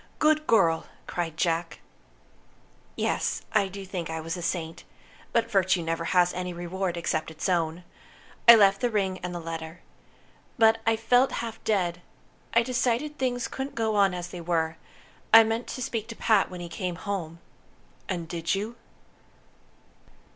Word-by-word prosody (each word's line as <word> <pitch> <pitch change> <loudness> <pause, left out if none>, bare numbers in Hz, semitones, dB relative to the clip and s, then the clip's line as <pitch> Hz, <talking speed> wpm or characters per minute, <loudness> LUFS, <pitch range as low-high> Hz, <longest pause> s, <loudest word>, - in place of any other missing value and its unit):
"Good 310 0 +2
girl!" 170 -8 +3 0.2
cried 165 -2 -4
Jack. 165 -1 -1 1.2
"Yes, - - -1
I 200 - +3
do 195 +1 -8
think 180 -3 -5
I 160 0 -3
was 160 +1 -4
a 175 - -6
saint. 170 -1 -3 0.5
But 230 -1 +1
virtue 190 -3 +2
never 165 +1 -2
has 180 0 +3
any 180 0 -4
reward 175 +1 -3
except 155 -2 -1
its 160 +3 -4
own. 170 -1 0 0.6
I 235 - +12
left 195 -2 +4
the 245 - +2
ring 195 -4 -1
and 180 - -5
the - - -3
letter. 165 0 -7 0.8
But 225 -1 +5
I 225 - +4
felt 245 +4 +3
half 225 -1 -7
dead. 180 -5 0 0.5
I 235 - +4
decided 255 +4 -1
things 245 -1 -1
couldn't 270 +1 -5
go 220 -2 0
on 195 -2 +3
as 175 0 -5
they 175 -1 -7
were. 165 -1 -1 0.5
I 225 0 +10
meant 225 +2 -2
to 255 - -4
speak 225 -2 -3
to 230 - -8
Pat 220 -4 +3
when 180 -1 -8
he 175 - -5
came 180 +1 -4
home." 170 -4 -4 0.7
"And 175 -3 -3
did 170 +1 -1
you?" 215 +4 -4
185 Hz, 160 wpm, -27 LUFS, 170-225 Hz, 1.2 s, I